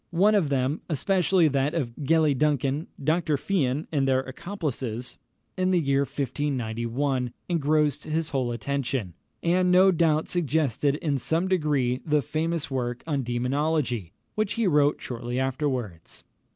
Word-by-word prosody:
One 190 Hz, +5 st, +3 dB
of 190 Hz, -8 st, +2 dB
them 135 Hz, +2 st, 0 dB
especially 180 Hz, +2 st, +2 dB
that 140 Hz, +3 st, 0 dB
of 130 Hz, -8 st, -2 dB
Gellie 155 Hz, 0 st, +3 dB
Duncan, 145 Hz, +1 st, 0 dB, 0.2 s
Dr. 155 Hz, 0 st, +1 dB
Fian, 145 Hz, -4 st, -1 dB
and 140 Hz, -3 st, +1 dB
their 130 Hz, -1 st, +3 dB
accomplices, 130 Hz, -, -5 dB, 0.4 s
in 185 Hz, 0 st, +1 dB
the 185 Hz, -1 st, +3 dB
year 140 Hz, -3 st, +1 dB
1591 130 Hz, -2 st, -2 dB, 0.2 s
engrossed 150 Hz, -3 st, +1 dB
his 160 Hz, 0 st, -1 dB
whole 130 Hz, -3 st, 0 dB
attention, 120 Hz, -4 st, -2 dB, 0.3 s
and 180 Hz, +2 st, +3 dB
no 185 Hz, +1 st, +6 dB
doubt 160 Hz, -3 st, +2 dB
suggested 150 Hz, -4 st, +1 dB
in 145 Hz, -3 st, -1 dB
some 165 Hz, +8 st, 0 dB
degree 145 Hz, -9 st, +1 dB
the 150 Hz, -3 st, +1 dB
famous 160 Hz, +1 st, -2 dB
work 125 Hz, -2 st, -2 dB
on 145 Hz, -4 st, -1 dB
Demonology, 125 Hz, -, -1 dB, 0.2 s
which 215 Hz, -1 st, -1 dB
he 230 Hz, -, 0 dB
wrote 150 Hz, -4 st, +3 dB
shortly 120 Hz, 0 st, -4 dB
afterwards. 130 Hz, -, -3 dB
145 Hz, 140 wpm, -26 LUFS, 130-160 Hz, 0.4 s, no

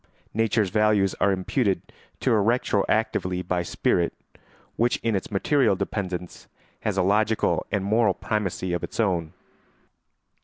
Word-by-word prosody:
Nature's 110 Hz, -3 st, +1 dB
values 105 Hz, -3 st, +3 dB
are 100 Hz, -, +4 dB
imputed 95 Hz, 0 st, -1 dB, 0.3 s
to -, -, +1 dB
her 110 Hz, -2 st, +4 dB
retroactively 100 Hz, -4 st, 0 dB
by 90 Hz, -1 st, 0 dB
spirit, 85 Hz, 0 st, 0 dB, 0.6 s
which 120 Hz, +1 st, +2 dB
in 115 Hz, -2 st, +1 dB
its 95 Hz, -, -3 dB
material 120 Hz, +3 st, +2 dB
dependence 90 Hz, -3 st, -4 dB, 0.3 s
has -, -, -2 dB
a -, -, +3 dB
logical 105 Hz, +3 st, +1 dB
and 100 Hz, -2 st, 0 dB
moral 110 Hz, -1 st, +3 dB
primacy 95 Hz, -4 st, -2 dB
of 85 Hz, -, -2 dB
its -, -, -6 dB
own. 90 Hz, -7 st, +1 dB
100 Hz, 130 wpm, -25 LUFS, 90-110 Hz, 0.6 s, are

